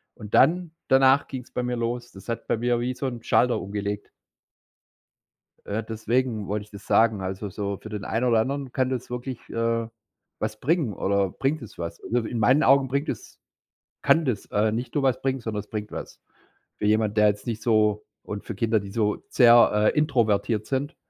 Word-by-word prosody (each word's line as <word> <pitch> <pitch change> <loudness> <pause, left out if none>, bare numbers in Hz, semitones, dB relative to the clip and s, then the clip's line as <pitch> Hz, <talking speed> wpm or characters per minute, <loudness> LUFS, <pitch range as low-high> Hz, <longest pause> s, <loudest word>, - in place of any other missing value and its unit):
Und 105 -1 -11
dann 175 0 +4 0.2
danach 135 +1 +5
ging's 130 -2 -8
bei - - -2
mir 125 0 -2
los. 120 +1 -3
Das 95 0 -14
hat 115 -1 -4
bei - - +1
mir 120 +1 +1
wie 125 +1 -2
so 135 - -4
'n 120 -3 -4
Schalter 125 +1 +2
umgelegt. 100 +1 -4 1.6
Äh, 110 +2 -2
deswegen 110 0 -1
wollte 105 +2 -2
ich - - -24
das 100 0 -11
sagen. 110 -3 +3
Also, 95 +2 -4
so 100 +1 -4
für 110 - -11
den 105 -2 -5
einen 115 +3 0
oder 115 -2 +4
anderen 135 +3 -2
kann 130 0 0
das 130 -2 -4
wirklich, 125 0 -5
äh, 115 0 0 0.5
was 110 0 -3
bringen 150 - +1
oder 100 +1 +1
bringt 140 - -1
das 115 - -11
was. 85 0 -5
Äh, 120 - -2
in 120 - -3
meinen 130 +7 +4
Augen 135 0 +5
bringt 140 +3 -1
es - - -7 0.6
kann 155 +4 +4
das, 120 -7 -1
äh, 105 +1 +1
nicht 120 +3 -4
nur 145 - +1
was 130 -2 +1
bringen, 135 0 0
sondern 110 -3 -4
es 105 - -17
bringt 105 -1 -5
was. - - -8 0.6
Für - - -1
jemand, 105 0 +2
der 105 0 +6
jetzt 105 0 -2
nicht 115 -2 -3
so 105 -2 +2 0.2
und 105 -1 -6
für 115 - -5
Kinder, 110 +2 +1
die 100 0 -8
so 105 0 0
sehr, 120 -2 +6 0.2
äh, - - 0
introvertiert 115 -7 +1
sind, 140 +4 -2
115 Hz, 200 wpm, -25 LUFS, 105-130 Hz, 1.6 s, der